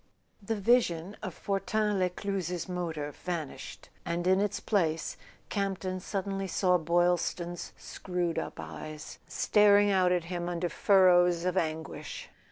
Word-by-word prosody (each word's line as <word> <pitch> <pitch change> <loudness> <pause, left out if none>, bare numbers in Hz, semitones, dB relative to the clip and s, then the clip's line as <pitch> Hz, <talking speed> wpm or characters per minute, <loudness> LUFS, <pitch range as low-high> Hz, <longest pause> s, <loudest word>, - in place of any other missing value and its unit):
The 225 +3 -2
vision 200 -4 +2
of 190 -6 -5
Fortin 205 +1 0
Lescluze's 180 -2 -2
motor 165 -5 -3
vanished, 165 -1 -6
and 170 +1 -2
in 190 +1 +4
its 205 -1 -1
place 165 -6 0 0.3
Campton 190 -2 -2
suddenly 195 0 -3
saw 180 -1 +2
Boylston's 175 +1 0
screwed 180 -2 -3
up - - -6
eyes 155 0 -8
staring 205 -1 +4
out 185 -2 +3
at 180 -2 +1
him 175 0 -4
under 175 0 -2
furrows 180 -3 +4
of 180 0 0
anguish. 160 -3 -3
180 Hz, 125 wpm, -30 LUFS, 170-195 Hz, 0.3 s, in